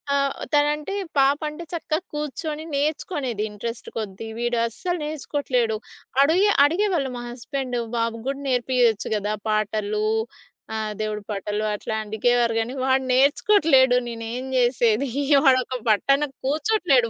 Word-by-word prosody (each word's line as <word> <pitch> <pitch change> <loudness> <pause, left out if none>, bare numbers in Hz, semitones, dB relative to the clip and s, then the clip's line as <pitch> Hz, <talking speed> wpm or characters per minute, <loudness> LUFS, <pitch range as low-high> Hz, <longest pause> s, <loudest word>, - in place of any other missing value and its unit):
ఆహ్, 275 -1 +1 0.2
తనంటే 295 +5 +1 0.2
పాప 275 +2 +4
అంటే 300 +3 -8
చక్కగా 320 -1 -1
కూర్చొని 300 +1 -4
నేర్చుకునేది 285 - -1
ఇంట్రెస్ట్ 230 +3 -6
కొద్ది. 215 0 -5
వీడస్సలు 240 - -1
నేర్చుకోవట్లేదు. 270 -6 -1 0.5
అడిగే 365 +8 +4 0.2
అడిగేవాళ్ళు 340 -4 +1
మా - - -5
హస్బెండు, 250 0 -4 0.2
"బాబు 230 0 0
గూడా 275 +1 -2
నేర్పియొచ్చు 245 -3 +2
కదా 210 +1 -1 0.2
పాటలు 215 0 0 0.7
ఆహ్, 215 -1 -2
దేవుడి 210 -1 -3
పాటలు" 210 +1 -2
అట్లా 220 +1 -4
అడిగేవారు 235 +2 +1
కానీ, 245 +4 -4
వాడు 265 0 +2
నేర్చుకోవట్లేదు. 270 -2 +4
నేనేం 230 +2 -5
చేసేది? 240 +1 +2 0.4
వాడొక 255 -1 +3
పట్టన 275 +7 +3 0.2
కూర్చోట్లేదు 290 - +2
255 Hz, 115 wpm, -23 LUFS, 225-295 Hz, 0.7 s, పాప